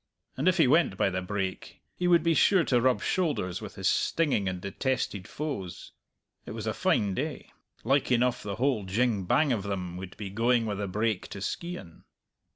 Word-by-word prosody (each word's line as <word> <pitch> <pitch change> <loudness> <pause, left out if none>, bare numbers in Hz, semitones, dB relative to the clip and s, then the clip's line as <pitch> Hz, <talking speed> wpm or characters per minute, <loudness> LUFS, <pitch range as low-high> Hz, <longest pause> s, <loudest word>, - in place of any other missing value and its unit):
And 140 +7 -1
if 185 0 +4
he 165 - +6
went 155 +7 +3
by 100 - +2
the 95 +1 -2
brake, 95 0 -4
he 180 - -1
would 170 -2 +5
be 165 -1 +3
sure 185 +2 +4
to 125 -5 +2
rub 130 0 +2
shoulders 145 - -1
with - - -8
his - - -1
stinging 140 - +1
and 90 -1 -4
detested 100 0 -2
foes. 100 - -5 0.5
It - - -8
was - - -5
a - - -1
fine 100 -2 +1
day; 150 +7 -4 0.3
like 135 +2 +2
enough 125 0 +2
the 100 -1 -4
whole 125 -2 +1
jing 105 0 +1
bang 145 - +3
of 110 - -1
them 90 -3 -4
would 95 0 -8
be 100 -3 -6
going 115 +2 +2
with 105 -2 -3
the 100 - -2
brake 105 +1 -1
to 100 - -8
Skeighan. 100 - -6
115 Hz, 195 wpm, -28 LUFS, 95-140 Hz, 0.5 s, he